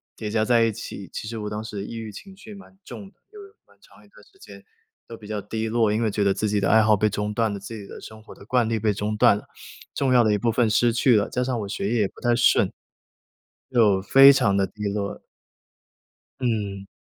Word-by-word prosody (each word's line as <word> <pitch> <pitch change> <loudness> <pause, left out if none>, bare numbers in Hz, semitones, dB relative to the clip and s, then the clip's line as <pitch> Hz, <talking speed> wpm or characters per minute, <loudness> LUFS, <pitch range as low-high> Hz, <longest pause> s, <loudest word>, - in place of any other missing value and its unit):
叠 110 - -6
加 110 -1 +1
在 115 0 +3
一 115 - +1
起， 100 -2 -9
其 105 - -6
实 115 0 -6
我 105 0 -5
当 105 +1 -5
时 105 -2 -6
抑 115 - -8
郁 110 -1 -6
情 190 - -12
绪 215 +1 -12
蛮 195 -1 -15
重 195 -1 -10
的， - - -38 0.2
就 415 -1 -12
有 400 - -14 0.2
蛮 - - -25
长 - - -21
一 - - -24
段 - - -19
时 390 - -27
间 - - -14 0.4
都 115 - -10
比 105 - -13
较 105 -1 -4
低 110 +2 -4
落。 115 -2 +1
因 110 - -1
为 110 - 0
觉 105 - -1
得 100 -1 +2
自 110 - -2
己 105 0 0
的 95 - +1
爱 110 0 +5
好 110 0 +4
被 110 +2 +1
中 105 +1 -3
断 110 0 0
了， 100 - -6
自 110 +3 -9
己 100 - -10
的 - - -10
生 110 0 -12
活 - - -14
的 - - -15
惯 120 0 +1
例 115 -1 -1
被 105 -1 0
中 105 +2 -3
断 120 -2 +5
了， - - -11 0.5
重 135 -2 +1
要 120 -1 +5
的 110 - +2
一 - - +1
部 115 +2 0
分 115 0 +1
失 115 +2 +2
去 120 0 +3
了， 100 - 0
加 125 - -2
上 125 -2 -2
我 100 - -5
学 100 0 -3
业 115 - +1
也 100 - +1
不 - - -18
太 120 -1 +2
顺， 120 - +3 1.0
就 105 -6 +3
非 135 +7 +7
常 115 -7 +1
地 95 -1 +1
低 105 -1 -10
落。 100 0 -4 1.2
嗯。 100 -5 -3
110 Hz, 280 characters per minute, -23 LUFS, 105-120 Hz, 1.2 s, 非